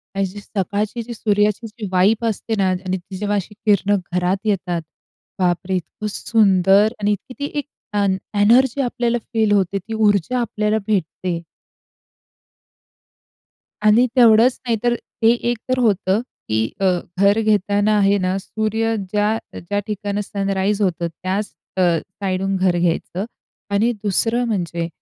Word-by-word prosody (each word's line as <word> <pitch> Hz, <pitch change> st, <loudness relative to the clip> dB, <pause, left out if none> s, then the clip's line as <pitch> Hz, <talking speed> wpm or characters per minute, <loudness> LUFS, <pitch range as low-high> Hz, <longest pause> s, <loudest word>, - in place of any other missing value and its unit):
आणि 195 Hz, 0 st, +1 dB
सकाळची 205 Hz, +3 st, -3 dB
जी 235 Hz, +1 st, -7 dB
सूर्याची 210 Hz, +1 st, +1 dB
जी 215 Hz, 0 st, -8 dB
व्हाइब 210 Hz, +5 st, +3 dB
असते 225 Hz, 0 st, -2 dB
ना 195 Hz, -1 st, +2 dB
आणि 185 Hz, 0 st, -2 dB
ती 185 Hz, +1 st, -10 dB
जेव्हा 205 Hz, +1 st, -1 dB
अशी 205 Hz, +2 st, -3 dB
किरणं 205 Hz, -1 st, +3 dB, 0.2 s
घरात 180 Hz, +2 st, +1 dB
येतात, 180 Hz, -4 st, -1 dB, 0.6 s
बापरे! 180 Hz, +1 st, 0 dB
इतकं 185 Hz, +4 st, -5 dB
सुंदर 200 Hz, 0 st, +3 dB
आणि 205 Hz, +1 st, +2 dB
इतकी 210 Hz, +5 st, -4 dB
ती 285 Hz, -, -3 dB
एक -, -, -4 dB, 0.3 s
अन् 200 Hz, -2 st, +2 dB, 0.2 s
एनर्जी 250 Hz, +5 st, +4 dB
आपल्याला 240 Hz, -1 st, 0 dB, 0.2 s
फील 220 Hz, -2 st, +2 dB
होते 195 Hz, -1 st, +2 dB
ती 220 Hz, +4 st, -7 dB
ऊर्जा 215 Hz, +2 st, +2 dB
आपल्याला 215 Hz, -2 st, 0 dB
भेटते. 180 Hz, -3 st, -1 dB, 2.5 s
आणि 225 Hz, +4 st, +6 dB
तेवढंच 235 Hz, +1 st, +6 dB
नाही 230 Hz, -2 st, +1 dB
तर, 240 Hz, 0 st, +2 dB
ते 225 Hz, 0 st, 0 dB, 0.2 s
एक 240 Hz, -, 0 dB
तर 255 Hz, 0 st, +1 dB
होतं 205 Hz, -2 st, +2 dB, 0.3 s
की 110 Hz, 0 st, +1 dB, 0.2 s
अ, 195 Hz, -, +1 dB, 0.3 s
घर 200 Hz, +2 st, +4 dB
घेताना 205 Hz, 0 st, +2 dB
आहे 200 Hz, 0 st, +3 dB
ना, 185 Hz, 0 st, 0 dB
सूर्य 220 Hz, +2 st, -1 dB
ज्या, 210 Hz, +3 st, 0 dB, 0.2 s
ज्या 205 Hz, +4 st, -2 dB
ठिकाणं 205 Hz, 0 st, -2 dB
सनराईज 200 Hz, 0 st, -1 dB
होतं 175 Hz, -3 st, 0 dB
त्याच 185 Hz, +2 st, -4 dB, 0.2 s
अ, -, -, +2 dB, 0.4 s
साईडून 195 Hz, 0 st, -1 dB
घर 185 Hz, -2 st, +2 dB
घ्यायचं 175 Hz, +3 st, -1 dB, 0.5 s
आणि 225 Hz, +4 st, +3 dB
दुसरं 225 Hz, +4 st, +2 dB
म्हणजे 175 Hz, -6 st, -2 dB
205 Hz, 140 wpm, -20 LUFS, 190-220 Hz, 2.5 s, आणि